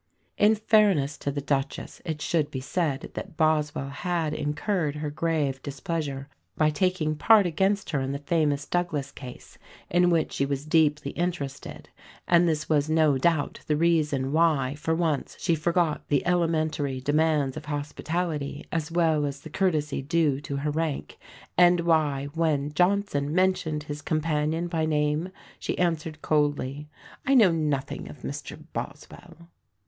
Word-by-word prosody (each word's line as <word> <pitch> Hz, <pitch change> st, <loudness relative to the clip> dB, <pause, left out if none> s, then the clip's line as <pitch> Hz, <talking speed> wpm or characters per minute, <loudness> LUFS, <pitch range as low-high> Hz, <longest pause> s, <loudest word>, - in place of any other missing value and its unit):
In 210 Hz, +1 st, +4 dB
fairness 205 Hz, -10 st, +3 dB
to -, -, -2 dB
the 145 Hz, +1 st, -3 dB
Duchess 135 Hz, -1 st, -3 dB
it 160 Hz, -3 st, -4 dB
should 155 Hz, -4 st, +1 dB
be 130 Hz, -, -4 dB
said 145 Hz, 0 st, -2 dB
that 160 Hz, -, -7 dB
Boswell 150 Hz, -3 st, +1 dB
had 165 Hz, +1 st, -2 dB
incurred 150 Hz, +1 st, -1 dB
her 150 Hz, 0 st, -4 dB
grave 150 Hz, -4 st, -1 dB
displeasure 140 Hz, -1 st, -4 dB, 0.3 s
by 155 Hz, 0 st, +3 dB
taking 160 Hz, -1 st, 0 dB
part 210 Hz, +5 st, +5 dB
against 195 Hz, +4 st, 0 dB
her 140 Hz, -4 st, 0 dB
in 135 Hz, 0 st, -2 dB
the 140 Hz, -, -2 dB
famous 145 Hz, -1 st, 0 dB
Douglas 155 Hz, -6 st, -2 dB
Case 125 Hz, -3 st, -11 dB, 0.3 s
in 175 Hz, +1 st, +4 dB
which 165 Hz, -3 st, +1 dB
she -, -, 0 dB
was 140 Hz, +1 st, -2 dB
deeply 150 Hz, -3 st, +2 dB
interested; 170 Hz, -6 st, -4 dB, 0.4 s
and 175 Hz, 0 st, +5 dB
this 155 Hz, -1 st, -1 dB
was 150 Hz, -1 st, +2 dB
no 155 Hz, -4 st, +3 dB
doubt 160 Hz, 0 st, +1 dB
the 150 Hz, -, +2 dB
reason 150 Hz, -5 st, +1 dB
why 150 Hz, -5 st, +2 dB
for 155 Hz, +2 st, -1 dB
once 160 Hz, -4 st, -1 dB
she 170 Hz, -, +1 dB
forgot 165 Hz, 0 st, 0 dB
the 145 Hz, -2 st, +1 dB
elementary 155 Hz, -6 st, 0 dB
demands 145 Hz, 0 st, +1 dB
of -, -, -7 dB
hospitality 150 Hz, 0 st, -3 dB
as 165 Hz, -2 st, -2 dB
well 165 Hz, -3 st, +2 dB
as 140 Hz, 0 st, -6 dB
the -, -, -10 dB
courtesy 155 Hz, -7 st, 0 dB
due 145 Hz, -1 st, +1 dB
to 140 Hz, -, -5 dB
her 145 Hz, +2 st, -1 dB
rank; 155 Hz, -1 st, -3 dB, 0.4 s
and 175 Hz, -1 st, +6 dB
why, 155 Hz, -5 st, +2 dB
when 150 Hz, -3 st, 0 dB
Johnson 180 Hz, -5 st, +1 dB
mentioned 180 Hz, -5 st, +1 dB
his 150 Hz, 0 st, -6 dB
companion 155 Hz, +1 st, 0 dB
by 160 Hz, -2 st, -1 dB
name, 150 Hz, +3 st, 0 dB, 0.3 s
she -, -, -3 dB
answered 165 Hz, -3 st, -1 dB
coldly, 145 Hz, -1 st, 0 dB, 0.3 s
"I 275 Hz, -, +3 dB
know 215 Hz, -8 st, +7 dB
nothing 150 Hz, -4 st, -2 dB
of 140 Hz, -, -12 dB
Mr 140 Hz, +1 st, -6 dB
Boswell." 170 Hz, +4 st, -8 dB
155 Hz, 155 wpm, -26 LUFS, 145-170 Hz, 0.4 s, know